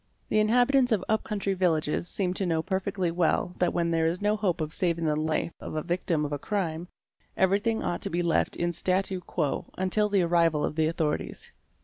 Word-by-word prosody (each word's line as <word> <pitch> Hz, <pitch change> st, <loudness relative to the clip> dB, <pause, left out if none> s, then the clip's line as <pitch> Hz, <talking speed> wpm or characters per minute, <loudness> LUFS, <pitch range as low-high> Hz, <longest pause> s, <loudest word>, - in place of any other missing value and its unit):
The 215 Hz, -, +3 dB
inhabitants 245 Hz, +4 st, +3 dB
of 205 Hz, -4 st, +1 dB
up 220 Hz, 0 st, +1 dB
country 200 Hz, -2 st, -2 dB
villages 170 Hz, -3 st, 0 dB
seem 180 Hz, -2 st, -1 dB
to 190 Hz, -, -1 dB
know 160 Hz, -2 st, 0 dB
perfectly 190 Hz, -1 st, -1 dB
well 175 Hz, +1 st, +1 dB
that 180 Hz, -, +2 dB
where 170 Hz, -1 st, 0 dB
there 165 Hz, -1 st, +1 dB
is 170 Hz, +2 st, -1 dB
no 210 Hz, +1 st, +1 dB
hope 195 Hz, -5 st, 0 dB
of 155 Hz, 0 st, -3 dB
saving 170 Hz, -2 st, 0 dB
the 150 Hz, -1 st, +2 dB
life 155 Hz, +2 st, -1 dB
of -, -, -7 dB
a 155 Hz, -, -1 dB
victim 170 Hz, -3 st, -1 dB
of 145 Hz, -, -5 dB
a 145 Hz, -, -2 dB
crime, 175 Hz, -3 st, -2 dB, 0.5 s
every 190 Hz, +1 st, +3 dB
thing 225 Hz, +1 st, -1 dB
ought 175 Hz, -, -2 dB
to -, -, -2 dB
be 175 Hz, +1 st, -1 dB
left 170 Hz, -, +1 dB
am 175 Hz, 0 st, +1 dB
statw 185 Hz, +1 st, -1 dB
quo 150 Hz, -6 st, -2 dB
until 200 Hz, +3 st, +1 dB
the 200 Hz, -3 st, +3 dB
arrival 165 Hz, -3 st, +2 dB
of -, -, -4 dB
the 160 Hz, 0 st, +2 dB
authorities. 160 Hz, -2 st, -3 dB
175 Hz, 215 wpm, -27 LUFS, 165-195 Hz, 0.5 s, The